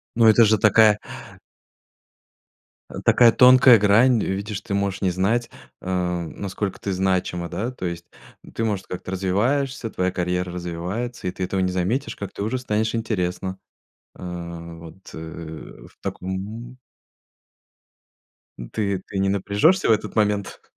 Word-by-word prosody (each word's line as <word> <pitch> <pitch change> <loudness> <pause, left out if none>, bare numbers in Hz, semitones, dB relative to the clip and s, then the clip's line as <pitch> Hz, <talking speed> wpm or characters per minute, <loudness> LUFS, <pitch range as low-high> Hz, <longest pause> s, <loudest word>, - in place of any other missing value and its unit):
Ну, 115 0 +4
это 110 +1 +7
же 110 0 +4
такая 110 0 +5 2.1
такая 120 -2 +6
тонкая 125 -1 +8
грань, 110 +4 +4
видишь, 100 +2 -3
ты 100 - -6
можешь 100 -1 -1
не 95 -2 +1
знать, 105 +7 0 0.3
э, 90 -1 -1
насколько 100 0 -4
ты 100 - -3
значима, 90 -2 -1
да, 115 +5 -3
то 110 -7 -7
есть 85 -1 -5 0.5
ты, 115 - -1
может, 105 -4 -2
как-то 90 0 -6
развиваешься, 115 +8 0
твоя 90 -3 -1
карьера 90 0 -2
развивается, 90 +7 -4
и - - -1
ты 95 - -5
этого 95 +1 -2
не 90 0 0
заметишь, 95 +10 -1
как 100 -2 -7
ты - - -4
уже 110 +5 -1
станешь 110 -3 -1
интересна. 95 -4 -2 0.6
А, 85 -1 -7
вот, 85 +3 -13
э, - - -8 0.7
в - - -22
таком 105 +7 -6 2.0
Ты 100 -3 -1
ты 95 - -4
не 95 0 +1
напряжешься 100 - +2
в - - +5
этот 110 - 0
момент? 105 -2 0
100 Hz, 140 wpm, -23 LUFS, 90-110 Hz, 2.1 s, тонкая